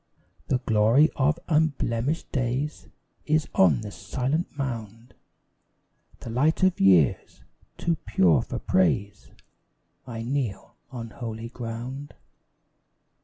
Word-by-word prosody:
The 130 - +2
glory 120 +5 +3
of 145 +3 +2
unblemished 150 -3 0
days 135 +3 -2 0.4
Is 155 0 +2
on 80 -9 +4
the 105 - -7
silent 140 - -2
mound 115 -3 -5 1.1
The 115 - -7
light 150 +9 +1
of 185 -1 +3
years, 90 -8 +3 0.3
too 170 -1 0
pure 90 - +4
for - - -5
praise; 100 +3 0 0.8
I 115 -2 -5
kneel 120 -5 -3
on 115 -4 -7
holy 115 -2 -6
ground! 125 +4 -7
120 Hz, 105 wpm, -26 LUFS, 110-145 Hz, 1.1 s, on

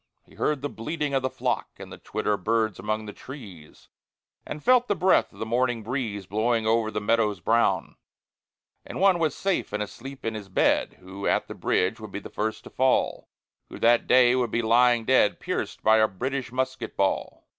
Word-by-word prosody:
He - - -21
heard 150 -3 -1
the - - 0
bleating 150 +4 -4
of 135 - +2
the 130 - -1
flock, - - -2
And - - -10
the - - -11
twitter 105 0 -2
of 100 - -4
birds 110 -3 0
among 110 0 -2
the 105 - -8
trees, 100 - -12 0.6
And 150 - -6
felt 250 -1 +4
the 205 - +1
breath 185 0 +3
of - - -19
the 110 - -4
morning 120 0 0
breeze 110 -5 -3
Blowing 110 +3 0
over 110 0 +2
the 105 - -3
meadows 105 0 +1
brown. 110 -6 +1 0.9
And - - -7
one 190 -2 +4
was 160 -4 0
safe 195 -1 -1
and 105 0 -1
asleep 130 +7 -10
in 115 - -1
his 105 -3 -7
bed - - +2
Who 95 +2 -6
at - - +1
the - - -7
bridge 95 +5 0
would 110 -2 -9
be 100 - -4
first 110 +1 -4
to - - -12
fall, 130 0 +1 0.4
Who - - -9
that 120 +1 +3
day 125 0 +5
would 125 -2 0
be 115 +2 -1
lying 120 0 +4
dead, 130 -5 +3
Pierced - - -4
by 110 0 +5
a 110 0 +4
British 130 +5 -4
musket 130 -2 -3
ball. 95 -1 -1
115 Hz, 200 wpm, -26 LUFS, 105-130 Hz, 0.9 s, day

